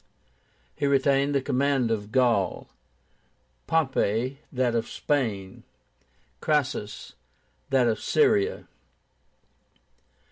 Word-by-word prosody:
He 140 - -1
retained 140 +1 +2
the 135 - +1
command 135 -3 +1
of 105 -1 -3
Gaul; 115 -7 +1 1.0
Pompey, 130 -4 0
that 125 -2 0
of 115 -1 -1
Spain; 110 -10 -2 0.8
Crassus, 140 -8 -2 0.6
that 130 -3 +3
of 110 - 0
Syria. 100 - +2
130 Hz, 80 wpm, -26 LUFS, 110-140 Hz, 1.0 s, that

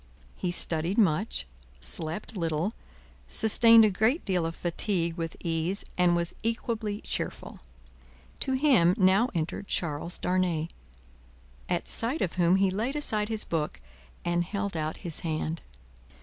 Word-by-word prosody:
He 180 - -3
studied 170 +1 0
much, 190 - +2 0.3
slept 155 - -2
little, 165 +3 -1 0.5
sustained 230 0 +6
a 210 - +2
great 220 - +1
deal 180 -4 0
of 165 - -6
fatigue 170 0 -1
with 165 -2 -5
ease, 170 +3 -1
and 175 -1 +3
was 170 0 -1
equably 225 -2 -2
cheerful. - - -5 0.8
To 265 - -1
him, 255 - +4
now 195 +6 +4
entered 170 +4 -3
Charles 170 +1 -2
Darnay, 180 -3 0 1.0
at - - -1
sight 245 +8 +1
of 175 - -2
whom 175 0 +3
he 195 0 +2
laid 225 +9 -2
aside 215 -8 -1
his 220 -1 +2
book 155 - -3 0.5
and 175 0 +1
held 200 +1 -4
out 155 0 -2
his 165 -3 -1
hand. 160 0 -3
180 Hz, 135 wpm, -28 LUFS, 165-215 Hz, 1.0 s, sustained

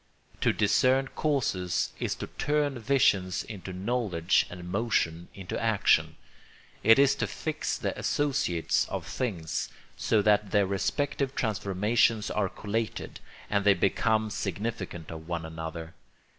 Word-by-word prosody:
To - - +3
discern 130 +1 +3
causes 110 - 0
is - - -1
to - - -5
turn 145 -3 +1
vision 110 -7 +3 0.2
into 95 -4 -7
knowledge 95 -3 +1
and 90 0 -8
motion 90 -5 0
into 95 +2 -5
action. 110 -3 +3 0.7
It 115 - +7
is 140 0 +5
to - - -1
fix 155 -1 -3
the - - -2
associates 140 - 0
of - - -4
things, 90 -11 -3 0.3
so 110 -2 +1
that 105 -1 +3
their 100 -1 +3
respective 135 +8 -1
transformations 105 +1 +1
are 100 -3 0
collated, 110 +3 -4 0.3
and 100 -1 +1
they 100 -1 +5
become 110 +4 +1
significant 95 -4 -4
of 80 0 -8
one 85 -1 -3
another. 80 0 -6
105 Hz, 130 wpm, -28 LUFS, 90-120 Hz, 0.7 s, It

